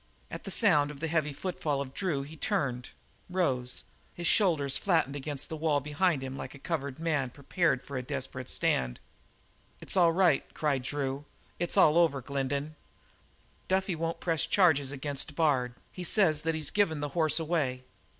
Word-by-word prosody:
At - - -7
the - - -4
sound 145 -1 +4
of 145 -2 -9
the 165 - -2
heavy 155 -2 +1
footfall 150 -2 -2
of 135 -1 -5
Drew 165 -7 -1
he 150 +3 -10
turned, 125 -4 -1 0.4
rose, 130 -9 0 0.3
his 175 - -5
shoulders 155 -9 +3
flattened 160 -7 +1
against 145 0 -3
the 160 - -5
wall 155 -2 +1
behind 150 +1 +1
him 130 0 -5
like 135 - -7
a - - -10
cornered 140 -2 -3
man 155 -5 0
prepared 140 +1 0
for 140 - -5
a - - -1
desperate 130 -1 -5
stand. 60 -1 0 0.8
"It's - - -6
all 175 -3 +5
right," 170 -4 +2
cried 145 -4 +1
Drew. 140 +1 -3 0.3
"It's 175 - -2
all 155 +2 +6
over, 160 -5 +3
Glendin. 140 +3 -2 0.9
Duffy 190 0 +1
won't 165 0 -2
press 165 -3 0
any - - -20
charges 145 -8 +4
against 145 0 -4
Bard; 130 -6 +2 0.2
he 180 - -7
says 170 -4 +2
that 165 +1 0
he's 155 -2 -3
given 185 -7 +2
the 145 0 -2
horse 155 +1 +2
away. 150 -6 -1
150 Hz, 175 wpm, -30 LUFS, 135-165 Hz, 0.9 s, all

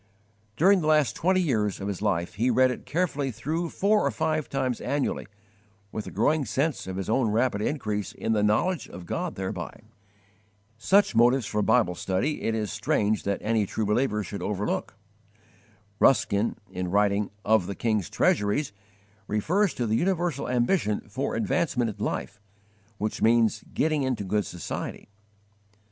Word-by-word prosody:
_ - - -38
During 190 - +5
the 155 - -1
last 150 -4 +3
twenty 185 +2 +2
years 110 - 0
of 100 - -4
his 100 -2 -4
life 85 -5 0
he 120 +5 +1
read 130 +1 +4
it - - -7
carefully 150 -4 0
through, 160 +8 -3
four 210 +4 +2
or - - +2
five 155 -2 -1
times 130 -3 -1
annually, 140 +2 -1 0.6
with 110 - -5
a - - -4
growing 155 0 +1
sense 135 +1 -1
of 95 - -4
his 95 0 -4
own 115 +1 +2
rapid 110 -1 +1
increase 105 -6 -2
in 110 - -2
the 105 - +2
knowledge 120 - +1
of 90 0 -9
God 175 - -3
thereby. 95 +2 -5 0.9
Such 190 - +3
motives 120 +2 +4
for 105 - -1
Bible 110 -4 +3
study 95 - -1
it 110 - 0
is 105 -2 -2
strange 105 -1 0
that 100 0 -1
any 110 -2 +1
true 110 - -2
believer 105 0 +1
should 100 - -6
overlook. 105 0 -2 1.0
Ruskin, 110 -5 +3 0.2
in 90 -1 -3
writing 100 +1 +2 0.2
"Of 110 -4 +3
the 100 - -4
King's 110 -7 0
Treasuries," 105 +4 +1 0.5
refers 175 - +1
to 120 - -1
the 110 0 +1
universal 175 -3 0
ambition 120 - +1
for 130 +6 -2
'advancement 155 - 0
in - - -3
life,' 105 - -3 0.6
which 105 +1 -3
means 115 -1 +3
'getting 155 -1 +1
into 130 -5 -1
good 105 +2 0
society.' 90 +3 -6
115 Hz, 160 wpm, -26 LUFS, 105-150 Hz, 1.0 s, During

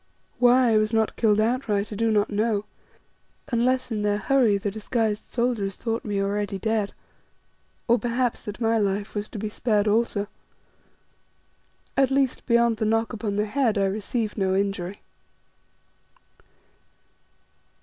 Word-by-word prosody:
Why 245 0 +5
I 220 - +4
was 215 +1 +1
not 220 -1 +1
killed 215 -2 +3
outright 215 -3 0
I - - -5
do 225 +2 +1
not 210 -1 +1
know, 210 0 0 0.8
unless 255 +1 +1
in 215 -2 -1
their 205 0 +1
hurry 235 -2 +3
the 200 0 -3
disguised 220 0 -1
soldiers 235 -6 -1
thought 230 0 -3
me 205 -2 -2
already 200 0 -1
dead, 215 0 -1 0.9
or 235 0 +4
perhaps 245 0 -1
that 210 +1 -6
my 225 -1 +2
life 200 0 -1
was 205 0 -3
to 225 - -8
be 215 +1 -3
spared 210 -1 0
also. 210 -1 +1 1.7
At 270 -2 +3
least, 270 -1 0
beyond 235 -1 +3
the 220 - -1
knock 225 +2 +1
upon 210 -2 -3
the 210 +1 +1
head 230 -1 +1
I 195 - +2
received 215 +2 -2
no 190 -1 +1
injury. 195 -1 -2
215 Hz, 145 wpm, -25 LUFS, 205-235 Hz, 1.7 s, Why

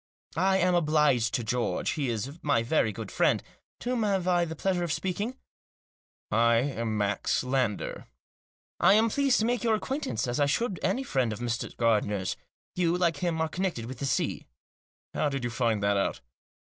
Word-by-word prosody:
" - - -24
I 190 +3 +3
am 180 -1 +2
obliged 150 -8 +3
to 120 - -1
George; 120 +2 -1
he 140 -4 -1
is 125 +8 -4
my 140 -6 +2
very 115 -3 +2
good - - -7
friend. - - +2 0.4
To 245 - -2
whom 250 -2 0
have 195 -4 0
I 175 -1 +3
the 160 -1 -6
pleasure 180 +1 0
of 170 - -2
speaking? 205 +10 -2 0.3
" - - -
" - - -70
I'm 115 0 +2
Max 105 +3 0
Lander." 125 -5 -1 0.7
"I 175 +3 +6
am 225 +1 +3
pleased 275 0 +2
to - - +1
make 245 0 0
your 225 -2 +3
acquaintance, 215 - -2
as 120 +2 -2
I 145 - +3
should 200 +5 0
any 265 - 0
friend 130 - 0
of 110 - -4
Mr. 120 -1 -3
Gardiner's. 105 -5 +1 0.4
You, 175 -1 +2
like 170 -4 +1
him, 170 0 -1
are 160 - +1
connected 175 -8 -2
with 125 +1 -8
the 140 - -2
sea." 130 - -1 0.7
"How 150 - +1
did 135 -3 -3
you 120 - -2
find 115 -3 0
that 100 0 +2
out? 100 - -1
145 Hz, 195 wpm, -28 LUFS, 115-185 Hz, 0.7 s, I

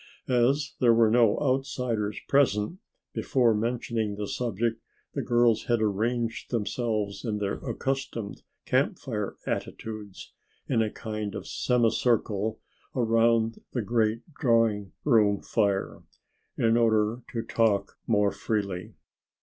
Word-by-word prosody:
As 135 +4 +2
there 120 -3 +5
were 115 -1 +4
no 115 -3 +4
outsiders 125 -6 -1
present, 135 - +2 0.3
before 120 -4 +2
mentioning 115 -1 -1
the 105 0 -4
subject 115 0 -2 0.3
the - - -1
girls 120 -2 +3
had 120 -1 +2
arranged 115 +3 -1
themselves 105 -2 -2
in 110 -4 -1
their 100 -1 -2
accustomed 135 -6 -3 0.2
Camp - - +1
Fire - - -4
attitudes, 105 -3 -5 0.3
in 120 -4 +2
a 110 - +1
kind 105 -2 -5
of - - -5
semi 120 -2 +2
circle 110 -3 0 0.4
about 115 -1 +2
the 120 - -1
great 110 +1 +1 0.2
drawing 115 -6 +2
room 105 -7 +4
fire, 100 -1 0 0.6
in 115 0 +3
order 110 0 +2
to 115 -2 -2
talk 110 -4 +1
more 105 -3 +3
freely. 100 -5 -3
115 Hz, 120 wpm, -27 LUFS, 105-120 Hz, 0.6 s, there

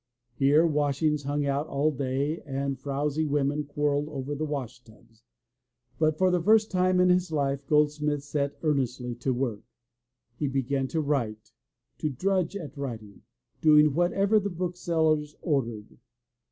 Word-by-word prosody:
Here 145 +5 +4
washings 150 -1 +1
hung 145 +1 -1
out 140 +2 -1
all 145 +2 +1
day 140 +3 -2
and 135 -1 -3
frowsy 145 +3 -1
women 145 0 0
quarreled 145 0 -1
over 140 -1 -4
the 155 +2 -3
washtubs, 120 -5 -8 0.8
but 155 -1 +2
for 185 +1 +3
the 180 -1 +1
first 215 +4 +4
time 185 -1 +2
in 180 0 +5
his 180 -1 +2
life 140 -2 -1
Goldsmith 150 -1 +1
set 145 -1 -2
earnestly 125 -5 -1
to 130 - -1
work. 120 -4 -2 0.8
He 150 - 0
began 135 0 -1
to 160 +3 -1
write, 120 -8 -2 0.5
to 155 - -1
drudge 185 +6 0
at 160 -6 -7
writing, 115 -8 -7 0.4
doing 150 -2 +6
whatever 195 +6 +2
the 200 0 -3
booksellers 165 -4 -1
ordered. 115 - -2
145 Hz, 140 wpm, -27 LUFS, 135-160 Hz, 0.8 s, doing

